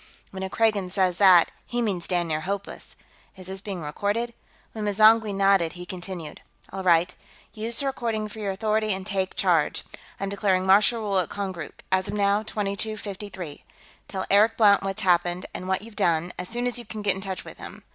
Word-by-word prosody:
"When 190 Hz, -, -7 dB
a 190 Hz, -, -3 dB
Kragan 210 Hz, -4 st, +1 dB
says 185 Hz, -2 st, +1 dB
that, 185 Hz, -4 st, +7 dB, 0.2 s
he 240 Hz, -, -2 dB
means 200 Hz, -7 st, -1 dB
damn 175 Hz, -2 st, 0 dB
near 155 Hz, -1 st, -1 dB
hopeless. 200 Hz, +4 st, -5 dB, 0.4 s
Is 185 Hz, -, -11 dB
this 190 Hz, +1 st, -5 dB
being 195 Hz, -4 st, -5 dB
recorded?" 205 Hz, +10 st, -2 dB, 0.4 s
When 215 Hz, -1 st, -5 dB
M'zangwe 215 Hz, +1 st, +5 dB
nodded, 195 Hz, -4 st, +3 dB
he 180 Hz, 0 st, -8 dB
continued: 180 Hz, -3 st, -7 dB, 0.3 s
"All 195 Hz, -, -4 dB
right. 180 Hz, -1 st, +3 dB, 0.4 s
Use 225 Hz, +2 st, 0 dB
the -, -, -2 dB
recording 230 Hz, -5 st, -2 dB
for 215 Hz, +1 st, -10 dB
your 205 Hz, -2 st, -2 dB
authority 215 Hz, +1 st, 0 dB
and 190 Hz, 0 st, -5 dB
take 190 Hz, -2 st, -2 dB
charge. 170 Hz, -5 st, +1 dB, 0.4 s
I'm 195 Hz, -, -2 dB
declaring 195 Hz, -2 st, +1 dB
martial 210 Hz, +4 st, +4 dB
rule 200 Hz, -3 st, +1 dB
at 180 Hz, -, -1 dB
Konkrook, 190 Hz, -6 st, -6 dB
as 190 Hz, +1 st, +2 dB
of 200 Hz, -, -3 dB
now, 200 Hz, 0 st, +2 dB
2253. 200 Hz, -5 st, -5 dB, 0.4 s
Tell 190 Hz, -1 st, -4 dB
Eric 215 Hz, +3 st, +5 dB
Blount 205 Hz, -3 st, +6 dB
what's 195 Hz, 0 st, -3 dB
happened, 175 Hz, 0 st, +2 dB
and 185 Hz, -, -6 dB
what 190 Hz, +1 st, 0 dB
you've 225 Hz, -1 st, -12 dB
done, 170 Hz, 0 st, +1 dB
as 180 Hz, -, -5 dB
soon 240 Hz, +1 st, -2 dB
as 245 Hz, 0 st, -1 dB
you 240 Hz, -, -9 dB
can 215 Hz, 0 st, -7 dB
get 200 Hz, -2 st, +3 dB
in 190 Hz, -, -7 dB
touch 190 Hz, -1 st, -5 dB
with -, -, -11 dB
him. -, -, -10 dB
195 Hz, 195 wpm, -25 LUFS, 185-215 Hz, 0.4 s, that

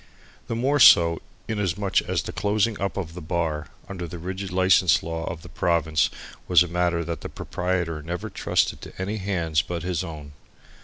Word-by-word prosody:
The 115 Hz, -, -2 dB
more 135 Hz, +5 st, +1 dB
so 85 Hz, -8 st, +7 dB, 0.3 s
inasmuch 100 Hz, -3 st, 0 dB
as -, -, -2 dB
the -, -, -5 dB
closing 105 Hz, +1 st, 0 dB
up 100 Hz, 0 st, -2 dB
of 85 Hz, -5 st, -4 dB
the 90 Hz, -, -8 dB
bar 80 Hz, -2 st, -2 dB, 0.2 s
under 90 Hz, -3 st, -5 dB
the 85 Hz, -, -7 dB
rigid 95 Hz, +2 st, -5 dB
license 95 Hz, -4 st, +4 dB
law 80 Hz, 0 st, -4 dB
of 85 Hz, -1 st, -6 dB
the -, -, -10 dB
province 80 Hz, -2 st, +1 dB, 0.4 s
was 90 Hz, -1 st, +6 dB
a -, -, -5 dB
matter 85 Hz, 0 st, 0 dB
that 85 Hz, 0 st, -4 dB
the -, -, -6 dB
proprietor 90 Hz, -3 st, -2 dB
never 85 Hz, +3 st, -5 dB
trusted -, -, 0 dB
to -, -, -11 dB
any 100 Hz, +3 st, -2 dB
hands 85 Hz, -6 st, 0 dB
but 85 Hz, 0 st, -5 dB
his 90 Hz, -1 st, -1 dB
own. 75 Hz, -4 st, -8 dB
90 Hz, 185 wpm, -25 LUFS, 80-95 Hz, 0.4 s, so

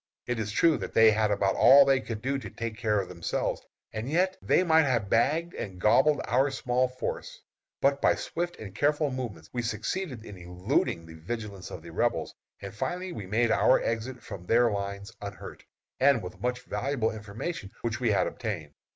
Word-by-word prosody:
It 125 Hz, -2 st, -2 dB
is 105 Hz, -1 st, -2 dB
true 160 Hz, +8 st, +4 dB
that -, -, -6 dB
they 110 Hz, -1 st, +7 dB
had 110 Hz, 0 st, +2 dB
about 100 Hz, -1 st, +1 dB
all 140 Hz, +1 st, +8 dB
they 135 Hz, -1 st, +4 dB
could 110 Hz, -1 st, -6 dB
do 135 Hz, +1 st, 0 dB
to -, -, -8 dB
take 115 Hz, -2 st, -5 dB
care 110 Hz, -2 st, +1 dB
of 95 Hz, -, -3 dB
themselves, 85 Hz, -2 st, -2 dB, 0.3 s
and 110 Hz, +4 st, -4 dB
yet 185 Hz, +4 st, +2 dB
they -, -, +3 dB
might 160 Hz, -3 st, +5 dB
have 115 Hz, -7 st, 0 dB
bagged 155 Hz, +9 st, +2 dB
and 95 Hz, -3 st, -6 dB
gobbled 145 Hz, +10 st, +4 dB
our 130 Hz, +4 st, +2 dB
small 130 Hz, -1 st, 0 dB
force. 125 Hz, 0 st, -5 dB, 0.4 s
But 140 Hz, 0 st, +2 dB
by -, -, +4 dB
swift 175 Hz, +1 st, -3 dB
and 100 Hz, -4 st, -9 dB
careful 150 Hz, +3 st, +1 dB
movements 110 Hz, -12 st, -6 dB
we 120 Hz, -, -1 dB
succeeded 115 Hz, -, -3 dB
in 100 Hz, -, -9 dB
eluding 90 Hz, -1 st, -1 dB
the 80 Hz, -, -12 dB
vigilance 100 Hz, +3 st, -6 dB
of 80 Hz, -, -8 dB
the 85 Hz, -, -10 dB
Rebels, -, -, 0 dB, 0.3 s
and 100 Hz, -1 st, -6 dB
finally 180 Hz, -, -3 dB
we 105 Hz, -, -7 dB
made 115 Hz, +3 st, +2 dB
our 130 Hz, -, +5 dB
exit 115 Hz, +3 st, -3 dB
from 95 Hz, -4 st, -9 dB
their 120 Hz, 0 st, +4 dB
lines 100 Hz, 0 st, -4 dB
unhurt, -, -, -8 dB, 0.4 s
and 135 Hz, -5 st, +4 dB
with 90 Hz, -, -9 dB
much 125 Hz, +1 st, -1 dB
valuable 130 Hz, -4 st, -1 dB
information 110 Hz, -, -6 dB
which 115 Hz, 0 st, -2 dB
we 120 Hz, -3 st, +1 dB
had 100 Hz, -, +3 dB
obtained. 90 Hz, -11 st, -5 dB
115 Hz, 195 wpm, -28 LUFS, 100-135 Hz, 0.4 s, all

